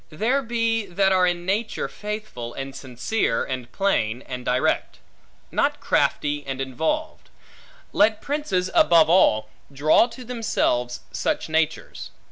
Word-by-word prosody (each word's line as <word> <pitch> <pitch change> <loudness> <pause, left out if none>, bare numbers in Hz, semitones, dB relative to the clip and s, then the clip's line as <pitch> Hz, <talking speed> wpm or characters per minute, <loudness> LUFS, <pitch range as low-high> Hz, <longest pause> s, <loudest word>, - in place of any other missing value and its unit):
There 225 - 0
be, 230 -3 0
that 190 +2 +2
are 185 -1 +4
in 175 0 -2
nature 210 +4 -1
faithful, 210 - -6
and 135 0 -6
sincere, 125 - -1
and 130 -2 -5
plain, 125 - 0
and 125 -1 -6
direct; 125 +1 0 0.5
not - - +1
crafty 145 0 0
and 135 -1 -4
involved; 160 - -3 0.6
let 215 +1 +3
princes, 210 -12 -2
above 165 -1 +5
all, 110 -12 +4 0.2
draw 150 - +4
to 245 +1 -10
themselves 215 - -1
such - - -1
natures. 160 0 -1
175 Hz, 125 wpm, -23 LUFS, 130-220 Hz, 0.6 s, above